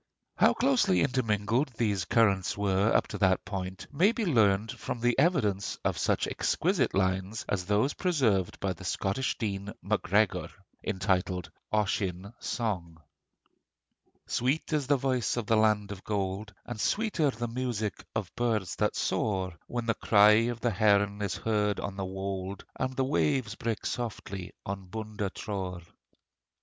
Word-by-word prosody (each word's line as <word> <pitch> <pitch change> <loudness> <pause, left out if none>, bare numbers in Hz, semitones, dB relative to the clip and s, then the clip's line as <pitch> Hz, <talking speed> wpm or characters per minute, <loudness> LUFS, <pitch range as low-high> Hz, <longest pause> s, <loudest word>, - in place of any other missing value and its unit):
How - - +4
closely 250 -8 +3
intermingled 120 0 +1
these 100 -6 +1
currents 100 -2 +2
were 100 +1 +2
up - - +3
to - - -5
that 95 -2 +3
point 95 -1 -5
may 185 +9 +4
be 230 -2 -2
learnt 110 - +3
from 120 -1 -5
the 120 +1 +2
evidence 110 - +1
of - - +2
such - - +1
exquisite - - +1
lines 95 +2 0
as 90 -3 -1
those 105 +8 +2
preserved 120 - +1
by 95 -2 -1
the 90 - -12
Scottish 100 +7 -1
Dean 100 -2 -3
Macgregor, 100 +3 +1 0.3
entitled 90 -2 -1 0.2
'Ossian 100 -1 -1
Sang': 90 -9 -3 1.3
Sweet 135 +6 0
is 145 -3 +1
the 145 0 +4
voice 125 -4 0
in 120 - -1
the 115 - +3
land 110 -2 +2
of 100 -1 -8
gold, 100 0 -2
And 120 -2 -6
sweeter 205 -9 +1
the 120 -2 -3
music 115 -3 -3
of 105 -4 -3
birds 110 -6 0
that - - +1
soar, 95 -4 0
When 120 -1 -3
the 115 - +2
cry 105 -1 +6 0.2
of 120 -2 -5
the 120 0 +1
heron 100 0 +3
is 100 -3 -1
heard 105 -2 0
on 100 - -4
the 95 -1 -3
wold, 95 0 -4
And 130 0 -2
the 130 - +1
waves 135 -4 +1
break 115 0 -3
softly 100 -6 -4
on 95 -1 -5
Bundatrore. 100 -3 -4
105 Hz, 150 wpm, -29 LUFS, 95-120 Hz, 1.3 s, cry